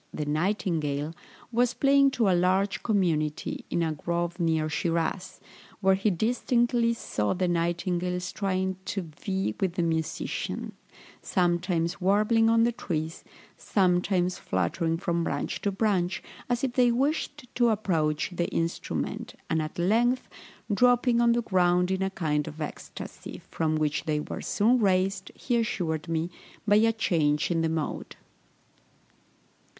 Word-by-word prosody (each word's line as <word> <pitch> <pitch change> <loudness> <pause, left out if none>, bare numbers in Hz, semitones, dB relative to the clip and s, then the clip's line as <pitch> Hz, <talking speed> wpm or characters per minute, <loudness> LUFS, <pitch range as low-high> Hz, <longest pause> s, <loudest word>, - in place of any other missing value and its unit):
the 150 - -4
nightingale), 155 -3 -1 0.4
was 245 +1 +2
playing 275 0 +5
to 245 -5 +1
a 190 - +4
large 185 +3 +2
company, 165 -8 0
in 170 - 0
a 160 - 0
grove 170 +3 -2
near 160 -2 +1
Shiraz, 170 +3 -2 0.4
where 190 -1 +4
he 195 +3 +1
distinctly 235 +3 +1
saw 105 - -1
the 180 0 0
nightingales 175 +1 -1
trying 190 -1 -1
to 200 -4 -3 0.2
vie 190 - -1
with 190 -3 0
the 175 - 0
musician, 160 -1 -2 0.5
sometimes 175 -1 0
warbling 215 +4 +3
on 230 0 +4
the 235 - +3
trees, 160 -7 -4 0.3
sometimes 180 -1 +1
fluttering 95 - -1
from 170 -1 -1
branch - - -2
to 200 - 0
branch, 195 -2 0 0.3
as 245 0 0
if 260 -2 0
they 245 -1 +4
wished 290 +2 -1
to 240 -1 +3
approach 165 -8 0
the 175 -1 -1
instrument, 165 0 -3 0.2
and 160 -1 +2
at 155 0 -6
length 235 +8 +2 0.5
dropping 245 +1 +4
on 235 0 +4
the 240 0 0
ground 180 -2 +2
in 190 0 0
a 190 - +1
kind 155 -5 -1
of 155 0 -8
ecstacy, 150 - -7
from 155 -1 0
which 155 0 0
they 155 -2 0
were - - -5
soon 235 +5 +2
raised, 190 -1 +1
he 245 -2 -1
assured 175 -8 -1
me, 165 +1 -1 0.4
by 205 0 +6
a 225 +1 +4
change 160 -8 +1
in 165 -1 +1
the 165 - +1
mode." 160 -2 -3
180 Hz, 145 wpm, -27 LUFS, 165-215 Hz, 0.5 s, by